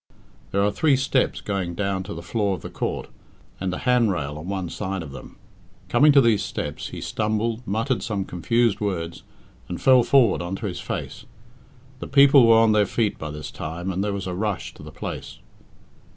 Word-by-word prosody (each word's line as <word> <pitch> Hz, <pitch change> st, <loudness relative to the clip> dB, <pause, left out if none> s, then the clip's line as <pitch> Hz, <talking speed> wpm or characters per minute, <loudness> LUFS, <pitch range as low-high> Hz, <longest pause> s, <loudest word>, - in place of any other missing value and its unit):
There 100 Hz, 0 st, +1 dB
are 105 Hz, -, +2 dB
three 150 Hz, +5 st, +3 dB
steps 135 Hz, 0 st, 0 dB
going 95 Hz, -4 st, -3 dB
down 95 Hz, 0 st, -1 dB
to -, -, -6 dB
the 85 Hz, -, -7 dB
floor 100 Hz, -1 st, 0 dB
of -, -, -11 dB
the -, -, -7 dB
court, -, -, -3 dB, 0.5 s
and 95 Hz, 0 st, -2 dB
a 90 Hz, -, -3 dB
handrail 100 Hz, -, +1 dB
on 80 Hz, -, -8 dB
one 95 Hz, -2 st, -3 dB
side 95 Hz, 0 st, -4 dB
of 70 Hz, -, -9 dB
them. 65 Hz, -, -11 dB, 0.5 s
Coming 150 Hz, +1 st, +5 dB
to 140 Hz, -, +7 dB
these 115 Hz, -4 st, +3 dB
steps, -, -, -4 dB
he -, -, -8 dB
stumbled, 110 Hz, +2 st, -1 dB
muttered 115 Hz, +6 st, 0 dB
some 100 Hz, -4 st, -2 dB
confused 115 Hz, +6 st, +1 dB
words, 85 Hz, -5 st, -3 dB, 0.5 s
and 90 Hz, -, -4 dB
fell 130 Hz, -2 st, +6 dB
forward 120 Hz, -5 st, +4 dB
on 85 Hz, +2 st, -3 dB
to 100 Hz, -, -6 dB
his 90 Hz, -4 st, -4 dB
face. -, -, -5 dB, 0.7 s
The -, -, -6 dB
people 140 Hz, -3 st, +6 dB
were 115 Hz, 0 st, +7 dB
on 115 Hz, -1 st, +5 dB
their 105 Hz, -2 st, +3 dB
feet 110 Hz, -1 st, -1 dB
by 75 Hz, -, -5 dB
this 75 Hz, 0 st, -7 dB
time, 85 Hz, +4 st, -5 dB
and 95 Hz, +2 st, -1 dB
there 105 Hz, -, -1 dB
was 100 Hz, -1 st, -4 dB
a 90 Hz, -, -3 dB
rush 100 Hz, +1 st, -3 dB
to -, -, -14 dB
the -, -, -10 dB
place. -, -, -7 dB
100 Hz, 200 wpm, -24 LUFS, 90-115 Hz, 0.7 s, to